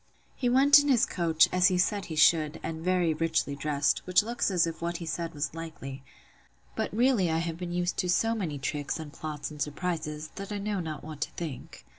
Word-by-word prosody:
He 245 - 0
went 280 +3 +7
in 290 - 0
his 255 -5 +4
coach, 165 -3 +3
as 180 0 +4
he 185 - +2
said 200 +2 +1
he 160 - -6
should, 155 0 +4
and 160 0 -5
very 180 -2 +2
richly 160 -2 0
dressed, 145 0 +1
which 185 +2 +4
looks 235 +1 -1
as 180 -4 +3
if 165 0 -6
what 170 0 -2
he 170 - -7
said 165 0 -4
was 145 +1 -2
likely: 155 -5 -7 0.7
but - - -2
really 230 -5 +2
I 160 - +1
have 165 0 -2
been 175 0 -5
used 175 0 -1
to 180 - 0
so 225 +5 +2
many 175 -10 -3
tricks, 145 +1 -3
and 150 -2 -8
plots, 155 -1 -5
and 150 -1 -9
surprises, 155 0 -3
that 195 +1 -6
I 205 - -2
know 205 0 -2
not 155 -4 -5
what 155 -1 -9
to 155 - -1
think. 160 -6 -7
165 Hz, 220 wpm, -28 LUFS, 155-185 Hz, 0.7 s, went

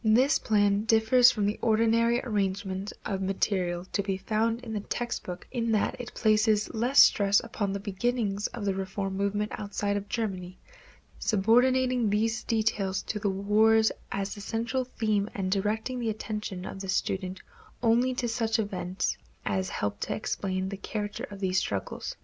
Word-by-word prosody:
This 245 +7 +4
plan 205 -1 +2
differs 225 +3 +6
from 210 -4 0
the 205 +1 -1
ordinary 230 +1 +3
arrangement 195 -3 -2
of 195 -2 -2
material 185 -2 -1
to - - +2
be 195 -1 -2
found 225 +4 0
in 230 -3 -7
the 210 - -1
text 240 +4 -3
book 180 -1 -7
in 230 -2 0
that 210 - +1
it 245 - -9
places 215 -1 +2
less 245 +5 +6
stress 200 0 +4
upon 215 -3 -3
the 200 - -2
beginnings 205 0 -1
of 230 -4 -6
the 195 - +1
reform 195 0 -3
movement 200 +2 -1
outside 205 0 -2
of 205 0 -4
Germany, 185 -6 -3 0.6
subordinating 245 +3 +3
these 220 +3 +1
details 215 -4 0
to 210 - -3
the 200 - 0
wars 215 +3 +3 0.2
as 195 0 -2
the 205 - -9
central 235 +5 -2
theme 215 -4 -1
and 185 -2 -2
directing 215 +6 -1
the 230 -2 -1
attention 210 -3 -4
of 195 - -7
the 195 -1 -6
student 185 0 -1 0.4
only 245 +3 +3
to 245 - -1
such 225 -1 0
events 190 -3 -2 0.3
as 95 -1 -1
help 100 0 -3
to - - -2
explain 190 -3 -2
the 195 - -5
character 205 +1 -4
of 200 -1 -9
these 190 -1 +1
struggles. 95 -1 -4
210 Hz, 165 wpm, -28 LUFS, 195-225 Hz, 0.6 s, differs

